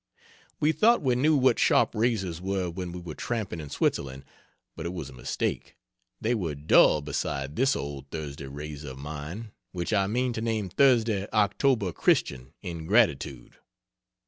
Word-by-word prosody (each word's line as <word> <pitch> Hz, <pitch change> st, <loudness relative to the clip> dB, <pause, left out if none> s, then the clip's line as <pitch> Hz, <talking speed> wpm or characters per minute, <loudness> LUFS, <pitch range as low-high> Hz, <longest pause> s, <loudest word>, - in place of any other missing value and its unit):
We 150 Hz, -, +3 dB
thought 230 Hz, +5 st, +4 dB
we 130 Hz, -2 st, +3 dB
knew 150 Hz, +6 st, +3 dB
what 130 Hz, -3 st, +3 dB
sharp -, -, +4 dB
razors 105 Hz, -7 st, 0 dB
were 95 Hz, -2 st, -1 dB
when 90 Hz, 0 st, -5 dB
we 90 Hz, -, -6 dB
were 85 Hz, -3 st, -7 dB
tramping 110 Hz, -3 st, -3 dB
in 75 Hz, -2 st, -7 dB
Switzerland, 65 Hz, -1 st, -1 dB, 0.5 s
but -, -, -5 dB
it 85 Hz, -, -4 dB
was 75 Hz, -6 st, -6 dB
a -, -, -13 dB
mistake 65 Hz, -, -3 dB, 0.4 s
they 115 Hz, +3 st, 0 dB
were 85 Hz, -10 st, -2 dB
dull 75 Hz, +1 st, +5 dB
beside 70 Hz, -1 st, -3 dB
this 135 Hz, +2 st, +3 dB
old 70 Hz, -1 st, -6 dB
Thursday 70 Hz, -3 st, -6 dB
razor 75 Hz, +1 st, -7 dB
of -, -, -12 dB
mine 75 Hz, +10 st, -7 dB, 0.2 s
which 90 Hz, +3 st, -2 dB
I 100 Hz, -2 st, +2 dB
mean 125 Hz, +4 st, 0 dB
to 110 Hz, -, -4 dB
name 110 Hz, -4 st, -1 dB
Thursday 115 Hz, -4 st, +3 dB
October 105 Hz, 0 st, +2 dB
Christian, 65 Hz, -4 st, +1 dB
in 85 Hz, -2 st, -6 dB
gratitude. 75 Hz, -, +1 dB
90 Hz, 165 wpm, -27 LUFS, 75-115 Hz, 0.5 s, dull